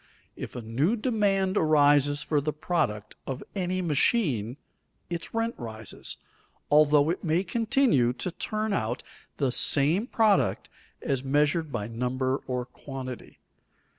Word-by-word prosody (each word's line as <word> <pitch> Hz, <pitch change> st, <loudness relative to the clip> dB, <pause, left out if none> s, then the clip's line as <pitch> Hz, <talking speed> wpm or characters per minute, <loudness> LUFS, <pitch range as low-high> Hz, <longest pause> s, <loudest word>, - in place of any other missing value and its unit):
If -, -, -7 dB
a 120 Hz, -, -5 dB
new 135 Hz, -, +1 dB
demand 205 Hz, -5 st, +1 dB
arises 145 Hz, -2 st, +4 dB
for 150 Hz, -2 st, +1 dB
the 150 Hz, +2 st, -1 dB
product 150 Hz, -, -2 dB
of 135 Hz, 0 st, -4 dB
any 185 Hz, -1 st, -1 dB
machine, 145 Hz, -, +1 dB, 0.5 s
its 170 Hz, -1 st, -4 dB
rent 225 Hz, +1 st, -1 dB
rises, 110 Hz, -2 st, -6 dB, 0.5 s
although 150 Hz, 0 st, +5 dB
it 180 Hz, -, -4 dB
may 170 Hz, +2 st, +1 dB
continue 225 Hz, -, +2 dB
to 180 Hz, -, -4 dB
turn 215 Hz, +4 st, -2 dB
out 120 Hz, -, -2 dB, 0.3 s
the 135 Hz, -3 st, +1 dB
same 155 Hz, -, +3 dB
product 220 Hz, -6 st, +2 dB, 0.3 s
as 135 Hz, -2 st, -1 dB
measured 150 Hz, +3 st, +1 dB
by 110 Hz, -5 st, -3 dB
number 130 Hz, +4 st, -1 dB
or 125 Hz, -1 st, -2 dB
quantity. 130 Hz, -1 st, -8 dB
150 Hz, 130 wpm, -27 LUFS, 130-185 Hz, 0.5 s, although